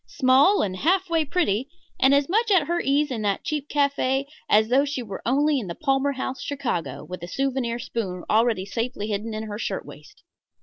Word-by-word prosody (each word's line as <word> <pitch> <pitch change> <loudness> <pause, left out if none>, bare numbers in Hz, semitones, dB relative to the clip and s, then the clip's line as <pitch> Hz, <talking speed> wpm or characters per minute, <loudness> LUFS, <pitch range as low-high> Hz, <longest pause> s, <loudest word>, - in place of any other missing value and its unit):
Small 275 +9 +4
and 185 -2 -3
half 365 - +1
way 325 -1 +3
pretty, 270 - 0 0.3
and 265 - +5
as 280 0 +3
much 445 +5 +1
at 370 -7 +4
her 345 +3 0
ease 285 +1 +1
in 230 -4 -3
that 200 -2 -1
cheap 300 -1 -3
café 280 -2 +1 0.2
as 215 +1 +4
though 265 +3 +4
she 280 -3 -3
were 200 -4 -7
only 285 +3 +2
in 215 - -6
the 170 - -5
Palmer 275 -1 +1
House, 260 0 -4
Chicago, 175 - -3
with 180 -1 -7
a 175 - -6
souvenir 260 +1 -1
spoon 195 -7 -4
already 220 -3 +2
safely 225 0 -3
hidden 215 +2 -3
in 215 - -4
her 210 -1 -6
shirt - - -3
waist. - - -14
260 Hz, 205 wpm, -24 LUFS, 215-285 Hz, 0.3 s, and